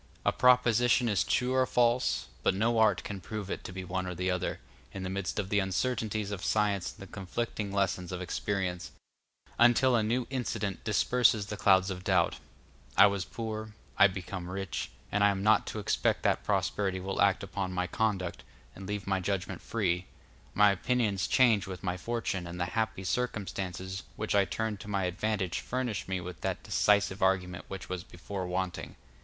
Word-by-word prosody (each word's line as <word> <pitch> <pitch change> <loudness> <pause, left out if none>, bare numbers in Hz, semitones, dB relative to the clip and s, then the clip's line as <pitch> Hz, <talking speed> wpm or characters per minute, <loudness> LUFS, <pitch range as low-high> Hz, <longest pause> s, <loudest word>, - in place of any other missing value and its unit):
A - - +4
proposition 120 -1 +4
is 105 -4 +2
true 125 +1 +1
or 130 -1 +3
false, 120 +1 +2 0.2
but - - +2
no 115 +3 +2
art 110 - +4
can 100 -2 -6
prove 105 0 -5
it - - -4
to - - -6
be 95 0 -6
one 95 +1 -3
or 90 - -4
the 90 +2 0
other, 90 -1 -2 0.3
in 95 - -6
the 95 - -3
midst 100 -1 -3
of 100 -2 -1
the 105 - +3
uncertainties 105 +1 -1
of 100 -2 -5
science 105 -3 +1
and - - -19
the - - -23
conflicting 105 +1 -3
lessons 95 -2 0
of 90 - -3
experience, 90 -1 -3 0.7
until 120 +2 +5
a 115 - +3
new 120 +3 0
incident 110 -7 -2
disperses 110 0 +3
the 105 - -5
clouds 95 -2 +4
of 90 -1 -6
doubt; 95 -3 +2 0.6
I - - +10
was 100 -2 +1
poor, 110 -1 -5 0.2
I - - +7
become 90 -1 -6
rich, 95 -1 -4 0.2
and 105 0 +2
I 105 - +6
am 100 -1 -1
not 110 +1 +4
to - - -4
expect 105 - 0
that - - +2
prosperity 95 -2 0
will 95 +1 -2
act 100 -1 +3
upon 95 -1 -3
my 90 0 -1
conduct, 95 -3 -1 0.3
and 95 0 -9
leave 105 0 -3
my 95 -1 +1
judgment 95 0 -3
free; 90 -5 -1 0.5
my 105 0 +6
opinions 105 -1 0
change 115 -7 +4
with 95 -1 -7
my 90 -1 -1
fortune, 100 -3 -3
and 85 +1 -7
the 90 - +1
happy 110 -3 -1
circumstances 95 -4 -3
which - - -2
I 100 -1 +4
turn 110 +1 -2
to 100 - -11
my 100 -2 0
advantage 95 0 -1
furnish 125 -4 -3
me 95 -1 -1
with 90 -2 -8
that - - -2
decisive 100 -1 +2
argument 90 -2 +1
which 95 -1 -7
was 90 -2 -4
before 90 +1 -6
wanting. 90 0 -3
100 Hz, 185 wpm, -30 LUFS, 95-110 Hz, 0.7 s, I